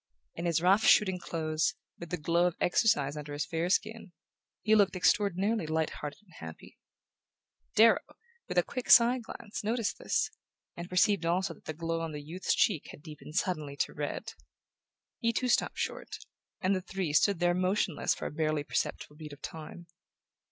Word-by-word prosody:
In 170 - -5
his 170 -1 +1
rough 195 +4 +4
shooting 190 -5 +5
clothes, 160 -2 -1 0.2
with 170 - -8
the 180 - -2
glow 170 +3 +2
of 175 - -3
exercise 150 - +2
under 150 -1 -7
his 145 - -2
fair 165 +1 -2
skin, 215 0 -1 0.5
he 215 - +3
looked 205 -3 +4
extraordinarily 200 0 +1
light 160 0 0
hearted 150 +7 -7
and 180 -4 -23
happy. 80 0 -11 1.0
Darrow, 225 +1 +6 0.5
with - - -4
a - - +5
quick 255 -2 -6
side 245 +1 +7
glance, 215 -2 -8
noticed 225 0 -1
this, - - 0 0.4
and 170 +1 -7
perceived 195 +1 +3
also 175 +3 0
that - - -22
the 155 - -5
glow 165 +1 -2
on 165 -1 -4
the 145 -1 -6
youth's 170 +5 -1
cheek 185 -9 +1
had 145 - -12
deepened 150 -1 -11
suddenly 155 -6 -1
to - - -1
red. - - -4 0.9
He 230 - +1
too 250 +2 -1
stopped - - +1
short, - - -4 0.4
and 195 +1 +2
the 185 - -2
three 185 -4 -3
stood 200 +5 +4
there 175 0 +3
motionless 185 -1 0
for - - -7
a - - -3
barely 155 -1 -1
perceptible 150 0 -3
beat 150 -2 -9
of 145 - -15
time. 165 +2 -8
175 Hz, 180 wpm, -30 LUFS, 155-200 Hz, 1.0 s, side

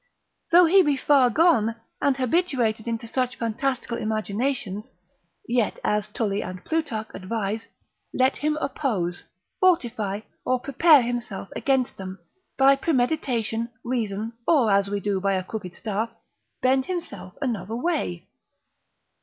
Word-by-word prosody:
Though 350 +1 +8
he 380 +4 +6
be 295 -5 +2
far 265 -2 +4
gone, 235 -6 +3 0.3
and 275 -2 +2
habituated 255 -6 0
unto 230 0 -2
such 250 +2 -1
fantastical 235 +1 -2
imaginations, 215 0 -2 0.6
yet 235 -2 0
as 210 -1 +1
Tully 205 -3 -1
and 185 0 -7
Plutarch 280 -10 -2
advise, 215 +2 -3 0.4
let 260 +1 +2
him 300 +1 0
oppose, 210 - -2 0.3
fortify, 230 - +1 0.2
or 255 0 +1
prepare 280 +2 +5
himself 235 -5 -4
against 265 -3 0
them, 190 0 -7 0.4
by 275 0 +6
premeditation, 245 -6 0
reason, 225 -3 -2
or 270 -10 +4
as 200 0 +3
we 205 0 -1
do 200 -1 -1
by 195 0 +1
a 185 -1 0
crooked 185 -3 -7
staff, 220 +1 -2 0.5
bend 260 +1 +3
himself 355 -2 -5
another 225 -6 -2
way. 235 - -2
235 Hz, 130 wpm, -25 LUFS, 210-275 Hz, 0.6 s, Though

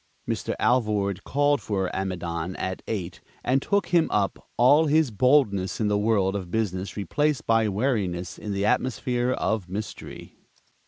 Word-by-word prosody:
Mr. - - -2
Alvord 105 -5 +1
called 145 0 +1
for 95 -3 -2
Amidon 90 -2 -3
at 95 0 -4
eight, 95 -5 -4 0.2
and 135 +2 +2
took 200 +5 0
him 170 -2 +3
up, 100 -2 -1
all 145 +6 +5
his 155 -3 +3
boldness 105 -5 +2
in 105 -2 +1
the 105 - +2
world 100 -3 +1
of 95 -3 -4
business 95 -2 -2
replaced 145 - 0
by 115 -1 +3
wariness 100 -6 -1
in 105 - -5
the 100 0 -1
atmosphere 125 +1 0
of 110 -7 -1
mystery. 105 +3 -7
105 Hz, 150 wpm, -25 LUFS, 95-130 Hz, 0.2 s, all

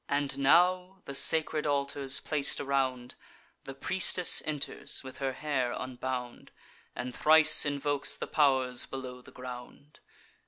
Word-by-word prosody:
And 145 -1 -1
now 180 +6 +2
(the 140 - -7
sacred 155 +1 +1
altars 140 -1 -1
plac'd 150 -2 -1
around) 130 -3 -2 0.5
The 135 - -8
priestess 180 +3 +2
enters, 150 -2 -3
with 130 -1 -10
her 135 -1 -2
hair 130 -3 -2
unbound, 125 -1 -6 0.5
And 125 0 -5
thrice 155 +1 +5
invokes 145 0 0
the - - -4
pow'rs 130 -4 +1
below 130 -1 -8
the - - -16
ground. 125 +3 -11
140 Hz, 125 wpm, -29 LUFS, 130-150 Hz, 0.5 s, thrice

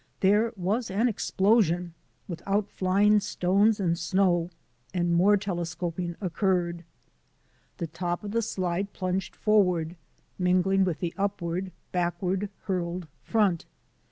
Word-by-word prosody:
There 210 +4 +4
was 210 +6 -1
an 210 +6 +2
explosion, 190 -5 +2 0.3
with 170 -2 -6
outflying 205 0 +3
stones 200 +4 +2
and 170 -4 +1
snow, 175 -1 +2 0.5
and 175 -1 +1
more 195 +4 +5
telescoping 175 -2 -3
occurred. 175 -2 0 0.9
The 170 - -2
top 175 +3 -3
of 205 - -5
the 230 +2 +1
slide 190 -2 -2
plunged 185 0 -2
forward, 180 -6 +2 0.4
mingling 185 +1 +3
with 175 -4 -2
the 170 -2 -2
upward, 190 -2 -2 0.2
back 175 -1 -1
ward 195 +1 -1
hurled 175 -2 -2
front. 200 -7 +1
185 Hz, 120 wpm, -27 LUFS, 175-200 Hz, 0.9 s, more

